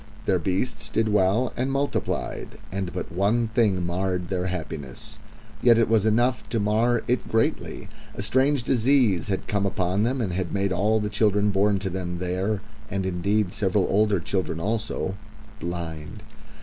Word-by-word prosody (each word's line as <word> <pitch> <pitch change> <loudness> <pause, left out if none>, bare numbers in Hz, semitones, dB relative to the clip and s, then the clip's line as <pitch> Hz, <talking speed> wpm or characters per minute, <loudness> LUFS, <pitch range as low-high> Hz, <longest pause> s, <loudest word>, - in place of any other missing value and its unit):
Their 95 - +2
beasts 95 +8 -1
did 110 -1 +1
well 105 +4 +2
and 130 +2 -1
multiplied, 140 +1 -2
and 95 -1 -3
but 90 - -5
one 105 +6 +1
thing 105 -6 +2
marred 90 0 -1
their 95 -1 -1
happiness. 80 -7 -6 0.4
Yet 120 -2 +6
it 115 - +3
was 110 -1 +3
enough 120 +3 +1
to 115 - 0
mar 110 +3 +2
it 125 +1 0
greatly. 110 0 -1 0.3
A 100 - -4
strange 130 +4 +2
disease 120 -7 +3
had 95 -2 -2
come 100 -1 +1
upon 95 +1 0
them, 125 +4 +1
and 100 -7 -1
had 90 -1 -2
made 100 -1 0
all 105 +4 +2
the 105 - -1
children 105 0 +2
born 100 +1 +3
to 95 0 -3
them 90 -1 -3
there 95 +4 -1 0.3
and 95 -1 -2
indeed, 95 +2 0
several 95 -2 +1
older 105 -1 +3
children 85 -2 -2
also 105 0 -2 0.5
blind. 80 -2 -5
100 Hz, 160 wpm, -25 LUFS, 90-110 Hz, 0.5 s, Yet